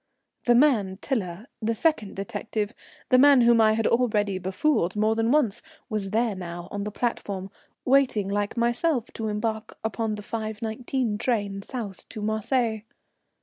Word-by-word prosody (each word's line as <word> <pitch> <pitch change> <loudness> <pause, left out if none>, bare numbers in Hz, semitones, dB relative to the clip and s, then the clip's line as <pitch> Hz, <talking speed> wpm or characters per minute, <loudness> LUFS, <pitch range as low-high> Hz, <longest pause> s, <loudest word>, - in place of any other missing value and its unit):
The 240 - +5
man 230 -9 +3
Tiler, 205 -7 -3 0.2
the 225 +1 0
second 265 -7 0
detective, 210 +2 -3 0.4
the 255 - +6
man 280 -1 +7
whom 235 -1 +5
I 215 0 +5
had 225 0 0
already 210 -5 +2
befooled 190 - 0
more 215 +1 +2
than 225 0 +1
once, 265 -9 +2 0.3
was 210 -3 -1
there 225 +1 +1
now 175 -2 -7
on 205 0 -3
the 210 - -3
platform, 200 -4 -3 0.3
waiting 255 -7 +3
like 205 +3 -2
myself 240 +2 +1
to 225 - -3
embark 220 +1 -3
upon 220 0 -1
the 210 - -8
5.19 220 +2 -3
train 205 -5 -1
south 210 -4 -7
to 215 - -7
Marseilles. 220 +1 0
220 Hz, 150 wpm, -26 LUFS, 205-240 Hz, 0.4 s, man